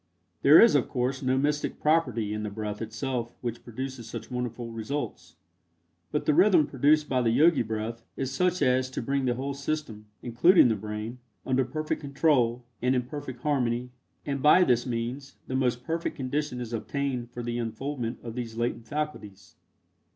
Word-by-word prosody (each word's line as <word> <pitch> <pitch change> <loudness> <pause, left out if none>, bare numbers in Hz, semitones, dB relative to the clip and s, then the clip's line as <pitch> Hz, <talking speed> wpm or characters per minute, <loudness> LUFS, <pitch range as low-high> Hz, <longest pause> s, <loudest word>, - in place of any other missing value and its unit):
There 145 +3 +8
is 230 - +7
of 145 -4 +2
course 130 +2 -1
no 130 0 +1
mystic 145 +2 0
property 125 -10 +1
in 105 - -3
the 105 - -3
breath 105 0 -5
itself 120 +2 -3
which 120 -1 -4
produces 125 0 -6
such - - -7
wonderful 120 -1 -4
results, 115 +6 -5 0.8
but 150 - -1
the 150 - +3
rhythm 175 -1 +5
produced 145 +3 +3
by 130 -2 +1
the 120 - +2
Yogi 155 +8 +4
breath 110 +1 -4 0.2
is 135 -1 -2
such 180 +3 +1
as 130 0 +2
to 130 - -4
bring 135 +2 0
the 120 -1 +1
whole 135 +3 -3
system, 140 -7 -4 0.2
including 125 +6 +5
the 110 - +2
brain, 105 +4 -6 0.3
under 130 0 +2
perfect 155 +4 -3
control, 135 -5 +1 0.2
and 125 +1 +2
in 125 - +1
perfect 130 -1 -7
harmony, 125 -4 0 0.3
and 140 -2 -2
by 155 +6 +7
this 125 -5 +2
means, 125 +4 -4
the 130 - -4
most 125 -2 0
perfect 165 +5 -2
condition 135 0 -2
is 120 -1 -6
obtained 125 +1 -2
for 120 0 -7
the 120 0 -2
unfoldment 120 +1 -3
of 115 - -6
these 115 -2 -5
latent 120 -1 -2
faculties. 105 -11 -5
125 Hz, 175 wpm, -27 LUFS, 115-145 Hz, 0.8 s, There